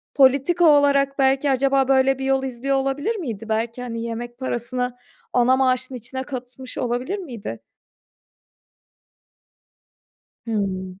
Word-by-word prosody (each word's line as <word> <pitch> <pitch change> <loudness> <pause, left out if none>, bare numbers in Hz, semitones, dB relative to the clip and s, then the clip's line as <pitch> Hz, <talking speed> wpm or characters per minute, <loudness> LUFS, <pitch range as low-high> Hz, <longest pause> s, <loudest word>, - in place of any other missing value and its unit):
politika 280 +6 +4
olarak 280 -2 +4
belki 270 +1 +3
acaba 270 0 +2
böyle 270 0 +3
bir 265 - -3
yol 270 0 +2
izliyor 265 +1 -1
olabilir 275 +11 -1
miydi? 225 - -5
Belki, 230 +2 -1
hani, 230 -2 -4
yemek 235 +1 -5
parasını 250 0 -3 0.4
ana 250 +1 +4
maaşın 260 0 +1
içine 255 +2 -6
katmış 255 -1 -8
olabilir 250 +9 -2
miydi? 235 - -7 2.9
Hımm. 190 -4 -3
260 Hz, 115 wpm, -22 LUFS, 240-275 Hz, 2.9 s, politika